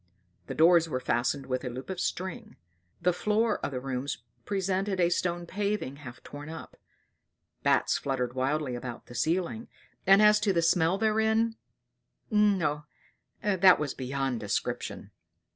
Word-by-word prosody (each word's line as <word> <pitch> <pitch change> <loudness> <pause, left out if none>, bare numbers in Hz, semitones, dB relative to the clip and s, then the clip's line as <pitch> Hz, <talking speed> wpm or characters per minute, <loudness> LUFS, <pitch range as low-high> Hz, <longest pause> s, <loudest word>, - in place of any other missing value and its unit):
The - - -5
doors 165 0 +5
were 130 - -1
fastened 125 +2 0
with 130 0 -2
a 125 - -3
loop 125 +2 -7
of 185 - -5
string; 185 0 -4 0.5
the 180 +1 +3
floor 215 +5 +1
of - - -2
the 130 -3 -4
rooms 130 -2 -4 0.2
presented 195 0 -1
a 170 -1 +4
stone 175 -1 -1
paving 200 -7 -2
half 120 -4 -11
torn 145 +1 -9
up; 160 - -9 0.9
bats - - +2
fluttered 125 -3 -2
wildly 135 +1 -1
about 120 -1 -6
the - - -12
ceiling; 180 - -1 0.4
and 195 +1 +8
as 210 0 +6
to 205 -2 +1
the 170 -2 +2
smell 165 +2 +3
therein 220 +1 +2 0.8
no 190 -9 +2 0.6
that 190 -2 +6
was 150 -3 -2
beyond 135 -1 -2
description. 105 -2 -3
165 Hz, 145 wpm, -29 LUFS, 130-195 Hz, 0.9 s, and